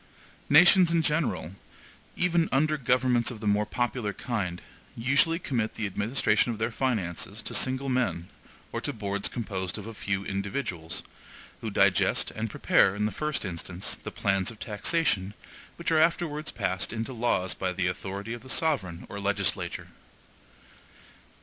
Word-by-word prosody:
Nations 175 +4 +7
in 165 -1 +2
general, 140 - 0 0.6
even 170 -2 +2
under 155 +3 +3
governments 125 -3 +2
of 120 -4 -6
the 105 - -7
more 105 0 +2
popular 120 -4 -1
kind, 95 -8 -3 0.4
usually 140 +7 +3
commit 120 -10 -2
the 110 - -2
administration 110 +5 +1
of 115 - -4
their 110 +2 -1
finances 110 -9 -2
to - - -4
single 130 +1 +1
men 125 -10 0 0.4
or - - -3
to - - -2
boards 100 -2 -2
composed 95 -6 -4
of 105 - -7
a 115 - -7
few 100 -2 -2
individuals, 95 -5 -3 0.6
who - - -4
digest - - +3
and 110 +1 -3
prepare, 95 -1 +3
in 105 +1 0
the 105 - 0
first 150 -6 -2
instance, 90 +1 -3
the - - -5
plans 95 0 0
of 115 - -8
taxation, 105 - 0 0.4
which 170 -1 -2
are 160 - +5
afterwards 160 -2 +1
passed 95 -3 -2
into 115 +3 -4
laws 110 -6 0
by 95 -1 -2
the 90 0 -1
authority 95 +4 -3
of 120 - -7
the 130 - -13
sovereign 100 - 0
or 100 - -6
legislature. 100 -1 -1
110 Hz, 155 wpm, -28 LUFS, 100-135 Hz, 0.6 s, Nations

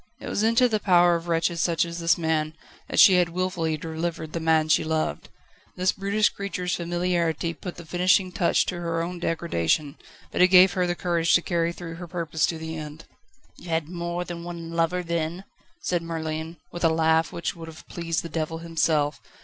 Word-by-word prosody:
It - - -8
was - - -1
into 230 +3 +4
the 220 -3 0
power 175 -3 +5
of 170 0 -2
wretches 170 0 0
such 170 -1 +2
as 170 0 -6
this 165 0 +3
man, 160 -2 -1 0.3
that - - 0
she 190 -2 +8
had 175 -1 +3
wilfully 170 -3 -1
delivered 160 0 -4
the 170 - -2
man 160 -1 +2
she 155 - +3
loved. 155 - -2 0.5
This 185 +1 +2
brutish 200 +2 +1
creature's 180 -3 -4
familiarity 170 -1 -1
put 175 +2 -8
the 170 - -10
finishing 180 +2 +2
touch 175 -1 +2
to 175 - -4
her 165 -1 -1
own 175 +1 -5
degradation, 155 - -1 0.3
but - - 0
it 180 - +8
gave 185 0 +7
her 180 -1 +1
the 175 - -1
courage 170 -2 +2
to 170 - +3
carry 170 -1 0
through 170 -1 -8
her 175 0 -8
purpose 165 -2 -1
to 165 - -3
the 160 0 -6
end. 155 0 -8 0.5
"You 175 - -11
had 160 -1 -1
more 175 0 -3
than 170 -1 -7
one 170 -1 -7
lover, 165 +2 0
then?" 170 +1 -2 0.4
said 175 -1 0
Merlin, 160 0 -4
with 175 - -6
a 165 - +5
laugh 160 0 +2
which 170 - -3
would 165 -1 -9
have 160 -1 -12
pleased 165 -1 -3
the - - -5
devil 165 0 -3
himself. 160 -3 0
170 Hz, 200 wpm, -25 LUFS, 160-175 Hz, 0.5 s, she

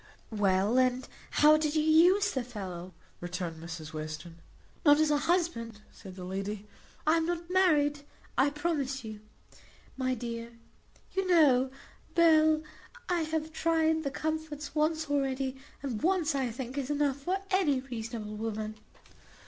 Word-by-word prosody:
"Well, 205 +2 +2
and 255 0 +1 0.2
how 305 +1 +6
did 310 0 -1
you 310 - +3
use 355 +6 +5
the 260 - -2
fellow?" 185 -6 -7 0.2
returned 175 -2 -5
Mrs 165 -2 -7
Western. 155 +2 -6 0.4
"Not 290 -1 +6
as 310 -1 +3
a 295 - +4
husband," 230 - 0
said 190 -3 -12
the 185 - -8
lady; 195 +3 -4 0.4
"I 315 +2 +4
am 325 0 0
not 345 0 -3
married, 300 -6 +3 0.4
I 265 +3 +4
promise 285 -3 -2
you, 215 -1 -7 0.8
my 255 -1 0
dear. 235 0 -6 0.6
You 385 0 0
know, 280 -7 +5 0.5
Bell, 315 -2 +5 0.5
I 350 -2 +2
have 315 0 -2
tried 320 -1 +2
the 280 - -1
comforts 310 0 -4
once 315 +1 +1
already; 270 -2 -1 0.3
and 250 -6 -3
once, 340 -2 +2
I 265 -3 0
think, 255 +3 -5
is 270 0 -4
enough 290 -2 +1
for 355 +7 -1
any 340 -8 +3
reasonable 225 -4 -6
woman." 215 0 -4
275 Hz, 145 wpm, -30 LUFS, 220-315 Hz, 0.8 s, how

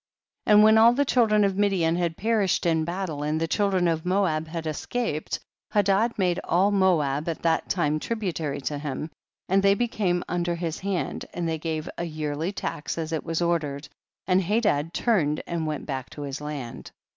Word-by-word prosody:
13. 210 - +6
And 210 - +8
when 220 +1 +7
all 230 +2 +7
the 285 +3 +1
children 220 -5 +3
of 195 -1 +1
Midian 185 -5 +2
had 170 -2 -1
perished 210 -4 +1
in 160 -2 +2
battle, 170 -4 -3
and 150 +1 0
the 165 - 0
children 190 -1 +1
of 160 -1 0
Moab 180 -4 +1
had 165 0 -5
escaped, 155 +2 -2 0.3
Hadad 205 +3 +2
made 180 -3 +1
all 190 +4 +2
Moab 165 -6 +2
at 165 - -4
that 165 -1 +1
time 155 -4 +1
tributary 165 -10 -3
to 145 +2 -3
him, 150 +2 -4 0.4
and 195 +1 +3
they 200 0 +4
became 200 -6 0
un 175 0 -1
der 175 0 -1
his 165 -2 -3
hand, 195 -2 -2
and 175 -1 -2
they 160 -1 -2
gave 160 0 -3
a - - -1
yearly 155 +1 -3
tax 160 -6 -4
as 160 -1 -3
it 160 - -2
was 165 +1 -1
ordered, 155 -4 -1 0.4
and 185 0 +3
Hadad 185 -6 +1
tm 175 -8 +1
ned - - -7
and 165 -2 -2
went 150 -1 -3
back 135 -3 -4
to 145 - -8
his 140 0 -5
land. 145 -5 -6
170 Hz, 195 wpm, -26 LUFS, 155-195 Hz, 0.4 s, And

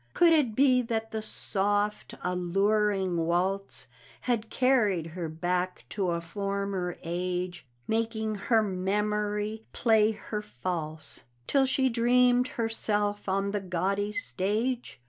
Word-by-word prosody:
Could 340 -1 +6
it 265 -9 +2
be 255 -1 +5
that 225 -2 -3
the 220 - -3
soft, 205 0 -1
alluring 190 +1 +1
waltz 190 +3 0 0.4
Had 230 -3 -1
carried 220 -11 +2
her 165 0 -5
back 180 +3 -2
to 195 -4 -1
a 170 0 0
former 195 0 -3
age, 180 -1 -3 0.2
Making 220 -1 -1
her 220 +2 +2
memory 210 +2 -1
play 220 -2 +4
her 210 0 -5
false, 160 -2 -5 0.2
Till 270 -1 +3
she 265 0 +2
dreamed 245 +1 +4
herself 205 -3 -1
on 195 +1 0
the 205 -1 -1
gaudy 195 +3 -1
stage? 210 - -1
205 Hz, 120 wpm, -28 LUFS, 185-225 Hz, 0.4 s, Could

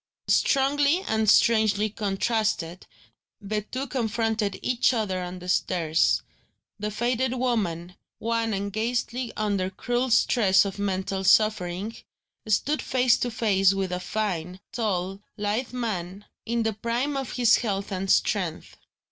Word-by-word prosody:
Strongly 285 +4 +3
and 220 -1 +1
strangely 215 -2 +4
contrasted, 205 -3 -2 0.5
the 210 +1 -3
two 255 +6 -5
confronted 225 -4 -1
each 250 0 +2
other 195 -5 -1
on 180 0 -6
the 180 0 -10
stairs. 170 -3 +1 0.6
The 210 +1 -2
faded 245 +4 0
woman, 190 -9 -1 0.2
wan 230 0 -1
and 200 0 -4
ghastly 240 +2 -2
under 200 -3 0
cruel 245 +6 -2
stress 205 -5 +4
of 200 0 -5
mental 190 -1 -2
suffering, 205 0 +2 0.5
stood 275 +8 +1
face 255 -1 +3
to 245 - -1
face 195 -4 +2
with 190 -2 -2
a 180 - -2
fine, 180 -3 -3
tall, 195 -4 -2 0.2
lithe 210 +4 -2
man, 205 -5 -4 0.2
in 235 0 0
the 220 0 0
prime 235 +7 -2
of 270 -2 -3
his 245 -2 +4
health 200 -3 -3
and 190 0 -3
strength. 185 -5 0
215 Hz, 130 wpm, -26 LUFS, 190-235 Hz, 0.6 s, strangely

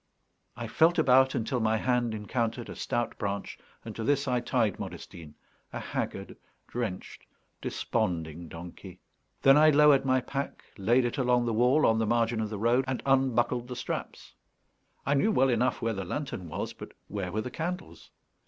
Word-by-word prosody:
I 120 - -4
felt 160 +9 +3
about 130 -3 +5
until 120 +3 -1
my 110 -1 +2
hand 120 -1 0
encountered 115 +2 -2
a - - -7
stout 120 -1 -2
branch, 100 -1 -4 0.3
and 110 - -7
to 115 - -4
this 140 +2 +1
I 125 -1 +2
tied 120 - 0
Modestine, 80 -4 -8 0.4
a - - -5
haggard, - - -4 0.3
drenched, 115 -7 -5 0.3
desponding 85 -1 -2
donkey. 90 +3 -10 0.4
Then 135 +1 +7
I 155 +1 +7
lowered 150 -2 +6
my 130 -1 +3
pack, 140 +2 -5
laid 120 +6 +2
it 120 +4 -2
along 125 -1 +2
the 115 - 0
wall 125 +7 +4
on 110 0 +3
the 110 - 0
margin 115 0 +1
of 110 - -2
the 105 - -5
road, 120 +5 +2
and 130 -1 -3
unbuckled 125 -2 +2
the 125 - -6
straps. - - -5 0.7
I 140 - +2
knew 145 +11 +3
well 135 -9 +3
enough 125 0 +1
where 115 0 +1
the 100 -2 -4
lantern 120 - -4
was, - - -4
but - - -11
where 95 -3 -4
were 110 - -1
the 125 - -6
candles? 180 +5 -5
120 Hz, 175 wpm, -29 LUFS, 110-135 Hz, 0.7 s, Then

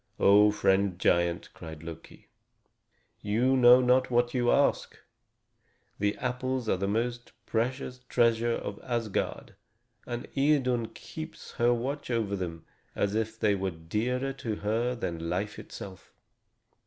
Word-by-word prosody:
"O 105 +1 +6
friend 100 -3 +2
giant!" 85 -1 +1
cried 80 -1 -10
Loki. 80 0 -11 0.9
"You 120 +6 +2
know 125 0 +7
not 125 +1 +3
what 120 0 +2
you 120 -2 +1
ask! 140 - +1 1.0
The 105 0 0
apples 125 0 -2
are 95 - +2
the 100 +1 -1
most 120 +3 -2
precious 125 +2 -2
treasure 115 0 +3
of 100 -3 -5
Asgard, 115 -4 -3 0.5
and 120 0 -5
Idun 135 -5 +2
keeps 155 +7 -9
watch 120 +4 0
over 110 -4 0
them 85 -4 -5 0.3
as 100 0 0
if 110 0 -2
they 105 -1 +3
were 95 -1 -1
dearer 110 +11 -2
to 115 -5 -4
her 115 +4 -1
than 85 -7 -4
life 100 +4 -2
itself. 95 -2 -10
115 Hz, 130 wpm, -29 LUFS, 100-125 Hz, 1.0 s, know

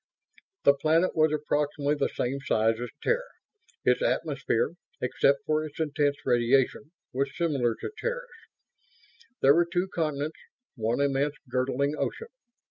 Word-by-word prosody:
The 140 - +7
planet 160 +5 +2
was 155 -1 +4
approximately 150 -1 0
the 150 - +1
same 135 +3 -2
size 110 -2 +2
as 120 - -4
Terra; 480 +1 +2 0.6
its - - +3
atmosphere, 480 -1 0 0.3
except 140 0 +2
for 155 0 +1
its 155 0 -8
intense 145 -2 +1
radiation, 130 +4 +2 0.2
was 135 +1 -2
similar 135 -9 +1
to - - -6
Terra's. - - -2 1.2
There 135 +1 +8
were 170 +2 +3
two 180 +1 0
continents; 155 -2 -2 0.3
one 115 -1 -1
immense 140 +1 +1
girdling 130 +3 0
ocean. 460 - -3
145 Hz, 130 wpm, -28 LUFS, 135-155 Hz, 1.2 s, There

